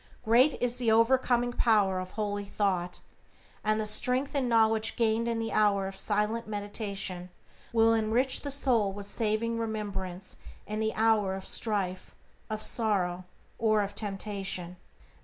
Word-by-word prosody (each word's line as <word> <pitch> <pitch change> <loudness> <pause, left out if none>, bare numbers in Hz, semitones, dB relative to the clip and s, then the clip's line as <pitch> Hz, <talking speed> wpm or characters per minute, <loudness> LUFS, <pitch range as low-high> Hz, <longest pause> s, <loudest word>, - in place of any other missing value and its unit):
Great 250 +6 +4
is 245 0 +1
the 235 -3 +2
overcoming 245 +1 +3
power 205 -6 +2
of 185 0 -6
holy 205 0 -3
thought, 185 -3 -2 0.6
and 215 0 +1
the 215 - -1
strength 250 +6 0
and 270 -4 0
knowledge 225 -1 +3
gained 230 0 +1
in 230 -1 -1
the 225 0 -3
hour 200 -2 +2
of 195 - -7
silent 210 +2 0
meditation 205 -3 -4 0.4
will 225 -1 +4
enrich 225 +4 +2
the 285 - -5
soul 250 -7 +1
with 200 +1 -7
saving 225 +2 -1
remembrance 200 -4 -4 0.3
in 215 +1 -4
the 220 0 -1
hour 215 -3 +2
of 190 - -7
strife, 195 -5 -1 0.3
of 215 0 -4
sorrow, 185 -6 +1 0.3
or 215 -2 +3
of 200 0 -5
temptation. 195 -3 -4
215 Hz, 145 wpm, -29 LUFS, 200-230 Hz, 0.6 s, Great